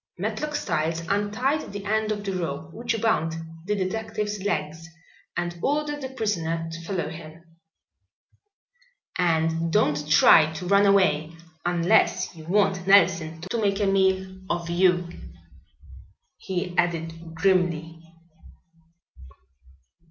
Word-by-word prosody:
Matlock 300 0 -3
Styles 165 - -1
untied 215 +9 0
the 205 0 -7
end 215 +1 0
of 205 -1 -3
the 195 - -2
rope 160 -2 -4
which 230 0 -2
bound 205 -8 +1 0.3
the 210 +2 0
detective's 210 +1 -3
legs 160 -4 -3 0.5
and 175 0 -3
ordered 295 +3 -1
the 265 - -5
prisoner 170 -10 -2
to 165 0 -7
follow 185 -1 -2
him. 160 +1 -10 1.8
"And 165 -1 +1
don't 150 -7 +1
try 155 0 +6
to 160 +4 -6
run 200 +2 +4
away, 165 -5 +2 0.3
unless 180 +2 +2
you 160 -1 -11
want 190 0 +1
Nelson 170 -5 +4
to 190 +6 -3
make 200 -1 +1
a 205 - +1
meal 190 -1 +1
of 170 -1 -2
you," 175 0 +3 1.3
he 180 -1 -4
added 165 -1 -2
grimly. 165 -3 0
180 Hz, 115 wpm, -25 LUFS, 165-205 Hz, 1.8 s, try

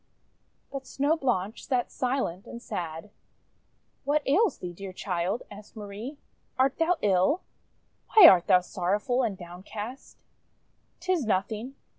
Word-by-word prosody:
But 270 -1 -6
Snow 285 +4 +1
Blanche 230 - -1
sat 250 -4 0
silent 250 -8 -2
and 235 - -8
sad. 170 -2 -6 0.9
"What 290 0 0
ails 380 +10 +3
thee, 180 -1 -6
dear 190 +1 -8
child?' 185 +3 -2
asked 205 +2 -12
Marie. 215 +7 -7 0.4
"Art 265 +2 +2
thou 335 +2 +2
ill? 195 - +3 0.7
Why 420 -5 +12
art 180 -2 +6
thou 180 - +6
sorrowful 205 +8 -1
and 215 -6 -1
downcast?' 205 +8 -8 0.8
"Tis 370 -5 0
nothing. 215 +6 -1
215 Hz, 125 wpm, -27 LUFS, 185-275 Hz, 0.9 s, Why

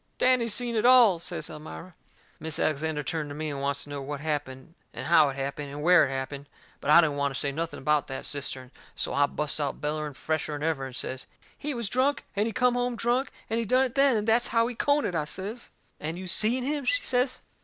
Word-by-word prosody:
"Danny 255 -2 +3
seen 235 +1 0
it 215 - +1
all," 240 -8 +7
says - - -3
Elmira. 160 +4 -9 0.5
Mis' 160 -1 -1
Alexander 155 0 0
turned 150 +2 -3
to 145 - -7
me, 155 0 -3
and 140 -1 -5
wants 140 0 -1
to - - -13
know 145 -1 -4
what 145 +1 -5
happened 145 0 -4 0.2
and - - -5
how 155 -2 +5
it 135 - -5
happened 140 +1 -4
and 145 +1 -6
where 180 -3 +6
it - - -6
happened. 140 +1 -5 0.3
But - - -5
I 160 +3 +9
don't 150 -4 0
want 140 -1 0
to - - -2
say 140 - 0
nothing 165 +3 -4
about 150 +1 +1
that 135 - -5
cistern. 130 -3 -4 0.2
So - - -2
I 145 0 +3
busts 150 +1 -2
out 145 -2 -2
bellering 150 -1 -3
fresher'n 150 -1 -2
ever, 155 -4 -1
and 130 - -10
I - - -2
says: 130 0 -4 0.3
"He 295 -1 -4
was 235 -3 -2
drunk, 260 +6 +1
and 205 +2 +1
he - - -2
come 250 +1 +2
home 245 0 -1
drunk, 240 +3 +1 0.2
and 225 - -1
he 230 - -1
done 255 +5 +3
it 250 - -5
then, 275 -3 +4
and 210 +1 -2
that's 235 +2 +4
how 230 0 +2
he 245 - -3
done 285 +4 +1
it," - - -2
I 155 -3 0
says. 205 +9 -5 0.3
"And 160 +3 -4
you 185 - -7
seen 225 +7 +1
him?" 290 +2 -1
she - - +1
says. 255 0 0
160 Hz, 245 wpm, -27 LUFS, 145-235 Hz, 0.5 s, I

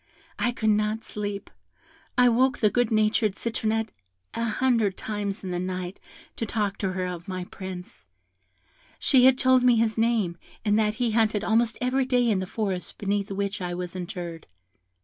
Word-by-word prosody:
I 240 - +2
could 220 -3 +1
not 215 +1 0
sleep; 205 -1 -5 0.7
I 250 0 +6
woke 255 +2 +3
the 210 -2 +3
good 245 -2 +2
natured 215 -1 +2
Citronette 225 -1 -1 0.4
an 230 0 -1
hundred 225 -4 +1
times 205 -1 -4
in 185 - -4
the 175 - -1
night 185 0 -4 0.4
to 230 - -1
talk 205 -2 -1
to 190 -2 -1
her 185 0 -2
of 180 -1 -6
my 185 -1 -3
Prince; 180 - -9 0.9
she 255 -2 +4
had 260 -1 +6
told 260 0 +4
me 250 -1 +5
his 225 -1 +1
name, 220 -7 +1 0.3
and 210 +1 +3
that 210 -1 +1
he 240 0 0
hunted 215 -2 +2
almost 225 +1 +2
every 255 +1 +1
day 245 -2 +3
in 210 -4 +2
the 185 - -3
forest 195 -3 -3
beneath 200 0 -1
which 200 0 -2
I 175 -1 -3
was 180 0 -5
interred. 175 -3 -6
210 Hz, 175 wpm, -26 LUFS, 185-230 Hz, 0.9 s, I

